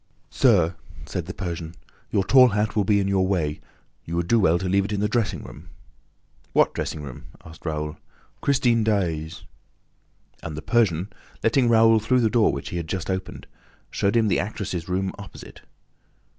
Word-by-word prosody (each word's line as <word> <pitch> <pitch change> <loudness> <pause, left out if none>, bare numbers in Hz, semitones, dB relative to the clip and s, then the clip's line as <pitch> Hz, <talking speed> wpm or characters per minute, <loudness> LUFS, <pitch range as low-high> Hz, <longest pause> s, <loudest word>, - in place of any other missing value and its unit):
"Sir," 90 -9 +3 0.3
said 90 -2 -5
the 95 - -5
Persian, 85 -3 -5 0.3
"your 100 - +1
tall 130 +5 +7
hat 105 -1 -1
will 105 - +2
be 100 +1 +3
in 100 - 0
your 95 -1 +2
way: 80 -6 -1 0.4
you 85 - -5
would 85 0 -1
do 115 +4 +4
well 85 -4 +3
to 95 +1 -3
leave 100 +2 +2
it 100 - -5
in 105 - -1
the 105 - +1
dressing 115 0 -1
room." 80 +4 -12 0.8
"What - - +3
dressing 75 - -4
room?" 65 -4 -9 0.2
asked 80 0 -11
Raoul. 75 -1 -3 0.4
"Christine 120 -5 +2
Daae's." 85 -7 -1 1.0
And 80 -2 -6
the 80 - -6
Persian, 100 -5 +1 0.3
letting 120 +2 +3
Raoul 115 -1 +5
through 125 +4 +2
the 110 -2 +2
door 115 -3 +4
which 70 - -5
he 90 - -4
had 85 -2 -4
just 95 +2 -3
opened, 95 0 -5 0.5
showed 100 +3 0
him 110 -1 +3
the 95 - +2
actress' 95 -3 -4
room 95 +1 -1
opposite. 100 - -11
95 Hz, 180 wpm, -24 LUFS, 85-110 Hz, 1.0 s, tall